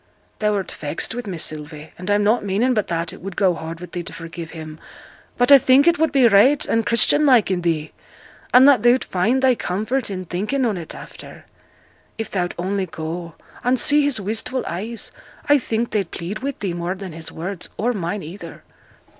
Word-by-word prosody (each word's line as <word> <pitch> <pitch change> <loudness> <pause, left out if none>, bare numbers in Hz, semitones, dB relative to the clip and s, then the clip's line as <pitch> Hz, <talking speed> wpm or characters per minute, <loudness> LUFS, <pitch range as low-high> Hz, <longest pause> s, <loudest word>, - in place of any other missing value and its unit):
'Thou'rt 210 -3 0
vexed 150 +7 -3
with 240 -1 -6
me, 185 -3 -4
Sylvie; 155 0 -5
and 180 +3 -7
I'm 205 0 +3
not 220 +3 +2
meaning 210 +6 +1
but 215 -4 0
that 165 0 -2
it - - -12
would 195 0 -7
go 190 -3 +3
hard 165 0 -7
with 180 - -10
thee 175 - -4
to 170 - -8
forgive 165 0 -8
him; 155 -1 -9 0.6
but 245 +3 +3
I 280 - +10
think 265 +3 +5
it 340 -1 +3
would 320 -2 +2
be 270 -4 +5
right 235 +7 +5
and 225 - +1
Christian 235 +6 +4
like 245 -7 +4
i' - - +3
thee, 165 -4 -1 0.6
and 255 +2 +7
that 275 -6 +6
thou'd 240 +3 +4
find 230 +9 0
thy 260 -1 +5
comfort 220 +5 -2
in 185 -2 -5
thinking 215 +10 -1
on 220 -4 0
it 170 -3 -7
after. - - -11 0.7
If 225 - -4
thou'd 180 -2 -2
only 190 +2 -2
go, 165 +1 -6 0.3
and 250 +1 +2
see 295 +1 +4
his 285 -5 +1
wistful 220 +6 -1
eyes 215 +7 -4 0.4
I 290 0 +5
think 230 -1 -2
they'd 200 -5 -1
plead 185 +6 -5
wi' 275 +1 -3
thee 190 -4 -2
more 175 +2 -3
than 190 -3 -8
his 160 0 -8
words, 175 +2 -6
or 240 +3 0
mine 190 0 -3
either.' 170 +1 -10
200 Hz, 205 wpm, -21 LUFS, 170-245 Hz, 0.7 s, I